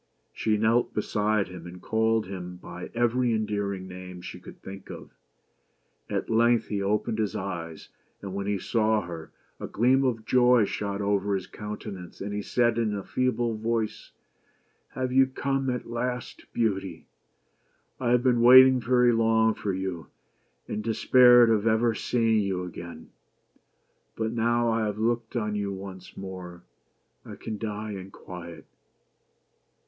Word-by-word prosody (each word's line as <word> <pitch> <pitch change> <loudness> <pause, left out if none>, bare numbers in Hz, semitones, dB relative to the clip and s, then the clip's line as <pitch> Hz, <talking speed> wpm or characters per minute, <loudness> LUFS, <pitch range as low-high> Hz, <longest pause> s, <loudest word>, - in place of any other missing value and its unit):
She 110 -1 0
knelt 110 +3 +2
beside 105 -1 0
him, 90 -1 -9
and 90 +1 -10
called 110 +2 +1
him 90 -1 -7
by 90 0 -9
every 120 0 +2
endearing 100 -3 -2
name 90 0 -9
she - - -8
could - - -13
think 95 0 -10
of. - - -9 1.0
At - - -2
length 115 +1 +3
he 100 -2 -1
opened 105 +2 0
his 105 -2 -1
eyes, 85 -4 -5 0.3
and 100 -2 -7
when 100 0 -3
he 105 -1 0
saw 110 +2 +1
her, 85 -3 -8 0.3
a - - -5
gleam 130 +5 +3
of 115 -4 -1
joy 125 -2 +5
shot 100 0 -3
over 100 0 +1
his 95 - -3
countenance, 105 -3 -8
and 100 +1 -4
he 105 - -2
said 120 +2 +1
in 110 -3 0
a 100 - -4
feeble 120 -3 0
voice, 110 0 -2 0.4
" - - -41
Have 130 -1 -2
you 135 0 +5
come 135 0 -1
at 125 -1 -3
last, 125 +1 -5
Beauty? 95 -6 -2 0.9
I 125 -2 0
have 120 0 +3
been 125 -3 +3
waiting 130 +1 +8
very 125 0 +3
long 110 -1 +3
for 100 - -3
you, 95 -4 -4 0.6
and 105 - -4
despaired 120 +1 +6
of 110 0 +2
ever 115 +1 +3
seeing 115 -1 +1
you 95 -3 -1
again. 85 -2 -9 1.0
But 110 0 -2
now 120 0 +1
I 110 -1 0
have 105 0 -3
looked 115 +1 -1
on 105 -3 -1
you 100 -1 -2
once 95 -1 -9
more, 90 -2 -8 0.6
I - - -9
can 110 -2 -6
die 105 0 -4
in 95 -1 -7
quiet." 90 -3 -10
110 Hz, 155 wpm, -27 LUFS, 95-120 Hz, 1.0 s, waiting